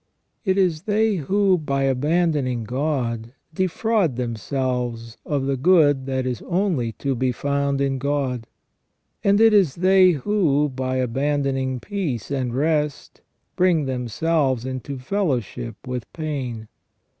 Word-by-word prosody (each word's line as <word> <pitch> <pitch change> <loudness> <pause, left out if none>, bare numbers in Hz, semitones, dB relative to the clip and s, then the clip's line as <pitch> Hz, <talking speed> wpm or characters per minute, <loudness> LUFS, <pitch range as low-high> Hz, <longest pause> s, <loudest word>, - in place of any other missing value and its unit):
It 190 -3 +1
is 175 -5 +2
they 215 0 +2
who, 190 +4 +2
by 140 -3 -1
abandoning 140 -2 +1
God, 120 -2 -2 0.2
defraud 185 - +1
themselves 120 -1 -3
of 140 -2 0
the 135 0 0
good 145 -3 +4
that 130 -1 -1
is 125 -2 -3
only 170 - 0
to 140 +3 -2
be 130 0 0
found 140 +1 -1
in 135 -1 0
God; 135 -4 -1 0.8
and 200 +1 +4
it 225 -1 +6
is 190 -10 +4
they 185 0 +5
who, 150 -3 +1
by 130 0 -3
abandoning 135 0 0
peace 150 - -4
and 130 -3 -1
rest, 150 0 -1 0.3
bring 175 -5 +3
themselves 130 +1 0
into 130 +1 -5
fellowship 125 - -2
with 125 -4 -5
pain. 130 -8 -4
140 Hz, 125 wpm, -22 LUFS, 125-165 Hz, 0.8 s, it